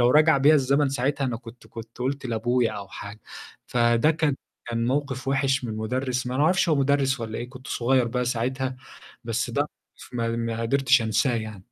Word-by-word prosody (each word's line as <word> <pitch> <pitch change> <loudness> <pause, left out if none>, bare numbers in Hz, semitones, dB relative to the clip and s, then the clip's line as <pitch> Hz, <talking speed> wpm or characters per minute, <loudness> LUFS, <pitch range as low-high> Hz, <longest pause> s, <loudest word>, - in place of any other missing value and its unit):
لو 120 0 +5
رجع 155 +1 +5
بيّا 145 +3 +6
الزمن 140 0 +3
ساعتها 135 +1 -1
أنا 120 -3 -1
كنت 115 0 -13
كنت 115 0 -11
قُلت 135 +2 -2
لأبويا 120 0 +1
أو 100 -2 -7
حاجة، 105 +2 -9 0.5
فده 120 +3 +3
كان 155 -3 +1 0.3
كان 115 0 -1
موقِف 135 -1 -1
وِحش 135 -1 +1
من 115 - -3
المدرس، 125 +4 -2
ما 125 - -3
أعرفش 165 +6 +3
هو 155 - +4
مدرس 135 -1 +2
والّا 110 -1 -4
إيه، 120 - -5
كنت 130 0 -12
صغيّر 125 +1 +2
بقى 125 +1 -1
ساعتها، 130 +2 -2 0.5
بس 115 +1 -1
ده 130 - 0
موقِف 150 - -14
ما 115 -1 0 0.3
ما - - -4
قدرتش 130 0 +3
أنساه 115 +3 +1
يعني. 110 -4 -6
125 Hz, 190 wpm, -25 LUFS, 115-135 Hz, 0.5 s, بيّا